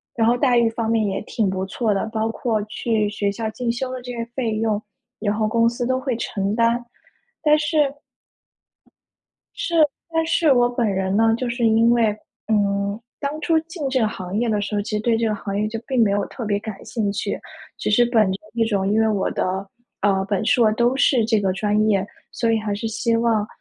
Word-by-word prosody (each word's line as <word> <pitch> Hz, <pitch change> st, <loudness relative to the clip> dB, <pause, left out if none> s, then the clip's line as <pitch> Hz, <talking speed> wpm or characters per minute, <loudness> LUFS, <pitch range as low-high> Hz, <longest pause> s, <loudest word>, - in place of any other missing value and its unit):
然 225 Hz, -1 st, +2 dB
后 240 Hz, +1 st, +3 dB
待 245 Hz, -2 st, +3 dB
遇 230 Hz, -1 st, +3 dB
方 225 Hz, 0 st, -3 dB
面 225 Hz, -1 st, +2 dB
也 195 Hz, 0 st, -2 dB
挺 210 Hz, -2 st, -1 dB
不 190 Hz, 0 st, -2 dB
错 215 Hz, +3 st, -1 dB
的， 195 Hz, -, 0 dB
包 220 Hz, 0 st, 0 dB
括 225 Hz, -1 st, -1 dB
去 215 Hz, -1 st, -1 dB
学 205 Hz, -1 st, -1 dB
校 220 Hz, +2 st, -3 dB
进 235 Hz, +2 st, -2 dB
修 255 Hz, +2 st, -3 dB
的 255 Hz, -, -4 dB
这 250 Hz, -, -6 dB
些 235 Hz, -1 st, -3 dB
费 230 Hz, -5 st, -1 dB
用， 215 Hz, -1 st, 0 dB, 0.4 s
然 205 Hz, -1 st, 0 dB
后 215 Hz, 0 st, 0 dB
公 230 Hz, +1 st, +3 dB
司 240 Hz, +1 st, -3 dB
都 260 Hz, +1 st, +1 dB
会 260 Hz, -2 st, -2 dB
承 200 Hz, -3 st, -2 dB
担。 235 Hz, +1 st, +2 dB, 0.6 s
但 300 Hz, 0 st, +5 dB
是 305 Hz, +1 st, -1 dB, 1.8 s
是， 340 Hz, -, -4 dB, 0.4 s
但 325 Hz, 0 st, +2 dB
是 330 Hz, -2 st, +3 dB
我 245 Hz, -2 st, +4 dB
本 245 Hz, -1 st, -1 dB
人 190 Hz, 0 st, -1 dB
呢， 225 Hz, +1 st, +4 dB
就 250 Hz, +1 st, -3 dB
是 235 Hz, 0 st, 0 dB
因 225 Hz, +1 st, +4 dB
为， 225 Hz, -3 st, +2 dB, 0.3 s
嗯 200 Hz, -1 st, +1 dB, 0.2 s
当 290 Hz, +2 st, -3 dB
初 325 Hz, 0 st, +2 dB
进 325 Hz, -3 st, -5 dB
这 260 Hz, 0 st, +1 dB
个 220 Hz, -, +3 dB
行 185 Hz, -2 st, -5 dB
业 235 Hz, +1 st, +1 dB
的 210 Hz, -1 st, +1 dB
时 205 Hz, +1 st, -3 dB
候， 205 Hz, -, 0 dB
其 210 Hz, -, -7 dB
实 210 Hz, -, 0 dB
对 230 Hz, 0 st, +2 dB
这 230 Hz, 0 st, 0 dB
个 215 Hz, -, 0 dB
行 200 Hz, -1 st, -4 dB
业 210 Hz, -, +1 dB
就 225 Hz, +1 st, -5 dB
并 260 Hz, -3 st, +2 dB
没 210 Hz, -, +3 dB
有 200 Hz, 0 st, 0 dB
特 240 Hz, -, -7 dB
别 205 Hz, -1 st, 0 dB
感 205 Hz, -1 st, -8 dB
兴 215 Hz, -4 st, -1 dB
趣， 200 Hz, -, -3 dB, 0.4 s
只 -, -, -1 dB
是 240 Hz, +3 st, +5 dB
本 225 Hz, -5 st, +3 dB
着 190 Hz, -, -3 dB
一 230 Hz, -1 st, +1 dB
种 200 Hz, -3 st, 0 dB
因 220 Hz, -, +3 dB
为 220 Hz, -, +3 dB
我 205 Hz, -3 st, 0 dB
的， 190 Hz, +2 st, -2 dB, 0.4 s
呃， 195 Hz, -1 st, +3 dB
本 200 Hz, 0 st, 0 dB
硕 230 Hz, -1 st, +4 dB
都 240 Hz, +3 st, +2 dB
是 265 Hz, -3 st, +3 dB
这 220 Hz, -1 st, +2 dB
个 195 Hz, -2 st, +1 dB
专 210 Hz, +2 st, +1 dB
业， 195 Hz, -2 st, +2 dB, 0.3 s
所 230 Hz, -1 st, 0 dB
以 225 Hz, -, +2 dB
还 215 Hz, -1 st, -2 dB
是 210 Hz, +3 st, -4 dB
希 230 Hz, +1 st, 0 dB
望， 230 Hz, -2 st, +1 dB
225 Hz, 245 characters per minute, -22 LUFS, 205-240 Hz, 1.8 s, 但